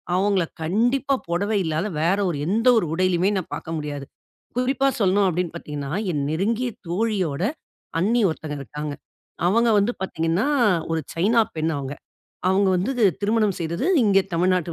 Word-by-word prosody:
அவங்கள 190 -1 +2 0.2
கண்டிப்பா, 245 - +1
புடவை 200 +5 0
இல்லாத 160 +5 -1
வேற 175 +5 +2
ஒரு 165 - -2
எந்த 225 +6 +1
ஒரு 175 - -2
உடையிலயுமே 185 +1 +2
நான் 185 - -5
பார்க்க 165 0 -5
முடியாது. 145 -2 -5 0.5
குறிப்பா 265 +2 +2
சொல்லணும், 195 0 +3
அப்படின்னு 175 -1 -2
பார்த்தீங்கன்னா, 145 -3 -6 0.2
என் 145 -2 -1
நெருங்கிய 225 +9 0 0.2
தோழியோட 185 -6 -1 0.6
அண்ணி 230 +6 +2
ஒருத்தங்க 155 -2 -6
இருக்காங்க. 150 +2 -5 0.5
அவங்க 230 +5 +3
வந்து 205 +4 +1
பார்த்திங்கன்னா, 170 - 0 0.4
ஒரு 165 - +1 0.2
சைனா 205 +8 +3 0.2
பெண் 160 +1 0
அவங்க. 140 0 -4 0.6
அவுங்க 195 +1 +3
வந்து 185 +8 0 0.3
திருமணம் 210 0 +2
செய்தது 170 - -2 0.2
இங்கே 195 -2 +4
தமிழ்நாட்டு 180 0 +1
185 Hz, 145 wpm, -23 LUFS, 160-210 Hz, 0.6 s, இங்கே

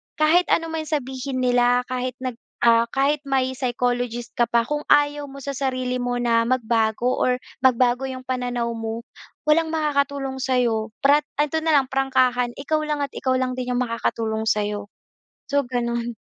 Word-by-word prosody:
kahit 320 +4 +3
ano 330 -1 +1
man 315 -1 -3
sabihin 265 -2 -3
nila 245 0 +3
kahit 255 0 -2
nag 250 -2 -4 0.2
ah, 235 0 +5
kahit 280 +2 +2
may 260 -1 +1
psychologist 245 -1 -1
ka 240 - +4
pa, 235 0 +2
kung 295 +5 -4
ayaw 290 0 +3
mo 275 0 -10
sa 280 - -3
sarili 255 -2 -2
mo 245 0 -1
na 230 -1 +2
magbago 235 -1 +1
or 250 0 +2 0.2
magbago 255 0 +3
'yong 260 -1 -6
pananaw 245 -2 -2
mo, 225 0 -4 0.4
walang 315 +2 +3
makakatulong 280 -4 -1
sa 260 0 0
'yo. 225 -3 +1 0.2
Prat 295 +2 +4 0.2
ito 300 +2 -1
na 320 -1 +2
lang 270 -2 +2
prangkahan, 255 -2 +1
ikaw 295 +3 -1
lang 295 -1 -1
at 280 - -4
ikaw 260 -1 -1
lang 255 0 0
din 250 0 -3
'yong 250 - +1
makakatulong 225 -2 -2
sa 210 -1 +2
'yo. 205 0 -4 0.6
So, 285 0 +1
gano'n. 235 -1 -2
255 Hz, 175 wpm, -23 LUFS, 240-275 Hz, 0.6 s, ah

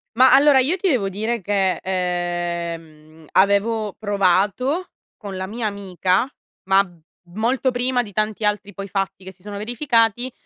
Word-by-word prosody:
Ma 255 +2 +6
allora 280 0 +6
io 290 +8 +2
ti 385 - -1
devo 230 - +1
dire 220 +4 -2
che, 190 -1 +1
ehm, 170 -4 -4
avevo 200 +2 +2
provato 205 - +1 0.3
con 200 -3 -8
la 185 - -3
mia 220 +3 -3
amica, 195 +1 0 0.4
ma 195 +1 +4 0.5
molto 245 +5 +1
prima 250 0 0
di 210 -4 -9
tanti 215 +1 -1
altri 205 0 -1
poi 195 +1 -7
fatti 195 -1 -3
che 190 - -8
si 185 -1 -24
sono 205 0 -7
verificati, 240 +1 +1
205 Hz, 150 wpm, -21 LUFS, 185-235 Hz, 0.5 s, Ma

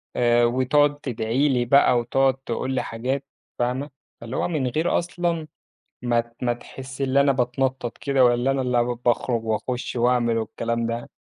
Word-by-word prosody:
آآ 120 0 +4
وتقعد 130 +4 +2
تدعي 125 +2 0
لي 125 -2 +1
بقى، 125 0 +5
وتقعد 135 +3 +2
تقول 130 0 -4
لي 130 - 0
حاجات، 130 +4 -3 0.3
فاهمة، 125 +4 -1 0.3
فاللي 115 +2 -6
هو - - 0
من 155 -7 -1
غير 155 +7 +1
أصلًا 170 -2 -2 0.5
ما 120 -1 +2
ت 120 0 -21
ما 120 -1 +2
تحس 130 +3 -10
إن 135 0 +1
أنا 140 0 +5
بتنطّط 130 -1 -1
كده، 135 -2 +2
والّا 120 +2 +2
إن 135 - 0
أنا 125 -2 +1
ال 120 0 -1
باخرج 120 -1 0
وأخُش 120 +4 -2
وأعمل 120 -1 +2
والكلام 115 +1 -2
ده. 115 +1 -4
125 Hz, 170 wpm, -23 LUFS, 120-135 Hz, 0.5 s, بقى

